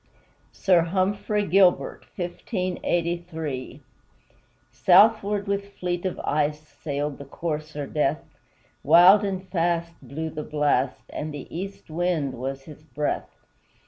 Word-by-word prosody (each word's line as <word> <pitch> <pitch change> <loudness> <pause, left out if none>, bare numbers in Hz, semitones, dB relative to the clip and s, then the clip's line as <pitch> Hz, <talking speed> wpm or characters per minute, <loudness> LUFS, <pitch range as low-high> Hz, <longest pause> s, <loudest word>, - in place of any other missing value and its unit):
SIR 180 -3 +3
HUMPHREY 200 +3 0
GILBERT 185 +1 +3 2.7
Southward 205 +1 +4
with 200 0 -2
fleet 175 0 -2
of 185 - -5
ice 150 +1 -1
Sailed 145 -1 -4
the 140 - -8
corsair 150 0 -4
Death; 150 +1 0 0.6
Wild 175 +7 +7
and 190 -2 -3
fast 170 -1 0
blew 160 +3 -5
the 155 - -5
blast, 145 -4 0
And 155 +1 -4
the 145 -2 -7
east 195 -2 -7
wind 165 -5 0
was 135 +2 -5
his 150 +1 -12
breath. 150 -1 -3
165 Hz, 110 wpm, -25 LUFS, 150-190 Hz, 2.7 s, Wild